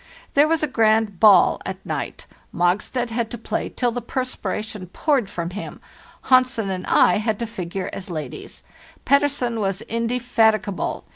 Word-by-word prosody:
There 290 Hz, +2 st, +5 dB
was 325 Hz, -1 st, +1 dB
a -, -, +2 dB
grand 220 Hz, -6 st, +2 dB
'ball' 205 Hz, -4 st, +6 dB
at 190 Hz, 0 st, -7 dB
night; 145 Hz, -5 st, -5 dB, 0.3 s
Mogstad 210 Hz, +7 st, 0 dB
had 230 Hz, -1 st, -1 dB
to 240 Hz, -, -6 dB
play 220 Hz, -1 st, -3 dB
till 245 Hz, -2 st, -1 dB
the 245 Hz, +1 st, -4 dB
perspira 255 Hz, -2 st, -3 dB
tion 210 Hz, -4 st, -7 dB
poured 255 Hz, -, 0 dB
from 170 Hz, -2 st, -4 dB
him; 205 Hz, +3 st, -7 dB, 0.4 s
Hansen 255 Hz, -5 st, +3 dB
and 185 Hz, -1 st, -5 dB
I 180 Hz, -, +4 dB
had 215 Hz, 0 st, -1 dB
to 235 Hz, -, -3 dB
figure 190 Hz, -4 st, -5 dB
as 195 Hz, 0 st, -6 dB
ladies. 155 Hz, -3 st, -7 dB, 0.4 s
Pettersen 280 Hz, -5 st, +2 dB
was 195 Hz, -2 st, -2 dB
indefatigable. 230 Hz, -4 st, 0 dB
220 Hz, 155 wpm, -22 LUFS, 190-245 Hz, 0.4 s, ball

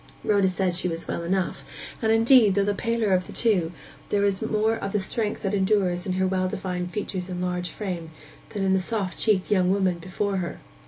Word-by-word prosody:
Rhoda 200 Hz, -3 st, +3 dB
said 185 Hz, -1 st, 0 dB
she 180 Hz, +1 st, +1 dB
was 165 Hz, -1 st, -4 dB
well -, -, -3 dB
enough; 185 Hz, +2 st, -1 dB, 0.4 s
and, 220 Hz, -1 st, +2 dB
indeed, 225 Hz, -2 st, +5 dB
though 200 Hz, -, +3 dB
the 205 Hz, -, +1 dB
paler 230 Hz, -1 st, 0 dB
of 180 Hz, 0 st, +1 dB
the -, -, -9 dB
two, 190 Hz, -8 st, +2 dB, 0.4 s
there 205 Hz, -, +1 dB
was 200 Hz, -1 st, +1 dB
more 220 Hz, 0 st, +1 dB
of 200 Hz, -3 st, -5 dB
the 210 Hz, -, +2 dB
strength 210 Hz, +2 st, -2 dB
that 195 Hz, 0 st, -1 dB
endures 190 Hz, -2 st, +1 dB
in 185 Hz, -, 0 dB
her 190 Hz, +1 st, +1 dB
well 185 Hz, 0 st, 0 dB
defined 180 Hz, -1 st, -3 dB
features 190 Hz, -2 st, -4 dB
and 180 Hz, -1 st, -4 dB
large 180 Hz, 0 st, -2 dB
frame, 180 Hz, -6 st, -5 dB, 0.4 s
than 200 Hz, -, -3 dB
in 190 Hz, 0 st, +2 dB
the 190 Hz, -, +3 dB
soft 195 Hz, -1 st, -2 dB
cheeked 210 Hz, -3 st, +2 dB
young 185 Hz, -3 st, +3 dB
woman 190 Hz, -3 st, +1 dB
before 190 Hz, +3 st, -2 dB
her. 175 Hz, -2 st, -3 dB
190 Hz, 215 wpm, -25 LUFS, 180-210 Hz, 0.4 s, indeed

